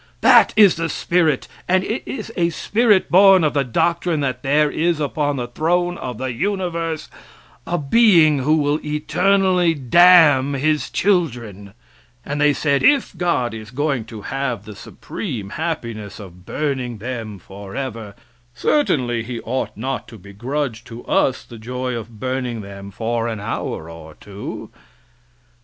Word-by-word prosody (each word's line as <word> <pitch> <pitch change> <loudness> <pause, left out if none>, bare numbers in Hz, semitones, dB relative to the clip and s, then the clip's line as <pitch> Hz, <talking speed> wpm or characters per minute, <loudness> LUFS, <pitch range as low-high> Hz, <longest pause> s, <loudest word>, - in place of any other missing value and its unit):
That - - +6
is 205 -6 +6
the 165 0 -2
spirit, 160 -6 0 0.2
and 185 +1 +2
it 220 +5 -3
is 225 -3 -6
a 170 -2 +1
spirit 210 +4 +1
born 190 0 +7
of 150 - +1
the 140 -2 +1
doctrine 170 +6 0
that 130 -2 -2
there 145 +2 +2
is 165 0 0
upon 145 0 -1
the 125 -2 -3
throne 175 +7 0
of 125 -3 -5
the 130 0 -3
universe 170 - -2 0.6
a 175 - 0
being 160 -2 +4
who 150 +4 +2
will 145 0 +1
eternally 180 +3 +1
damn 145 -1 +5
his 150 +2 0
children, 120 - -1 0.5
and 145 0 -3
they 150 0 +5
said: 140 0 0
"If 285 -8 +3
God 170 -9 0
is 110 -1 -8
going 135 -2 -2
to 110 -2 -10
have 130 -6 -3
the 105 0 -10
supreme 105 - -7
happiness 115 - -5
of 90 -2 -13
burning 130 -6 -3
them 110 -2 -6
forever, 100 +3 -7 0.4
certainly 125 - +1
he 115 +1 -6
ought 115 -3 -4
not 130 +4 -4
to 115 -1 -12
begrudge 115 +5 -4
to 115 -1 -10
us 130 - +1
the 115 -2 -12
joy 125 +2 -4
of 115 -1 -7
burning 130 -2 -3
them 100 0 -9
for 115 +3 -2
an 110 -2 -4
hour 85 -5 -4
or 80 -2 -11
two." 100 0 -8
135 Hz, 150 wpm, -20 LUFS, 115-165 Hz, 0.6 s, born